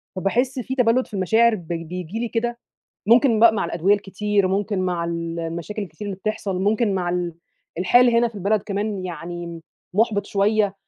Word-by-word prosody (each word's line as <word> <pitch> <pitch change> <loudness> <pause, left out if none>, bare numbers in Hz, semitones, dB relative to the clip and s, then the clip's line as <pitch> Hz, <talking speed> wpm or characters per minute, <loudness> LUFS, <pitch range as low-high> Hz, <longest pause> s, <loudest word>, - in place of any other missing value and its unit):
فباحِس 245 +8 0
في 255 +2 -4
تبلّد 250 0 +2
في - - -22
المشاعر 220 +4 +3
بي 170 -3 -5
بييجي 180 +4 -6
لي 240 - -1
كده، 235 +1 -2 0.5
ممكن 235 -1 +5
بقى 230 -1 +7
مع 220 - -1
الأدوية 175 +4 +2
الكتير، 200 0 0
ممكن 200 +1 -1
مع 180 -2 -1
ال 170 0 -3
المشاكل 170 +6 -4
الكتير 195 +2 -8
اللي 195 - -4
بتحصل، 205 -3 -3
ممكن 210 +1 +1
مع 180 -2 -1
ال 175 -1 -2 0.4
الحال 245 +7 +5
هنا 235 0 +3
في 225 - -17
البلد 200 +1 0
كمان 200 -1 -3
يعني 170 -1 -6 0.3
مُحبِط 210 -1 +1
شويّة، 205 0 +1
200 Hz, 175 wpm, -22 LUFS, 180-220 Hz, 0.5 s, بقى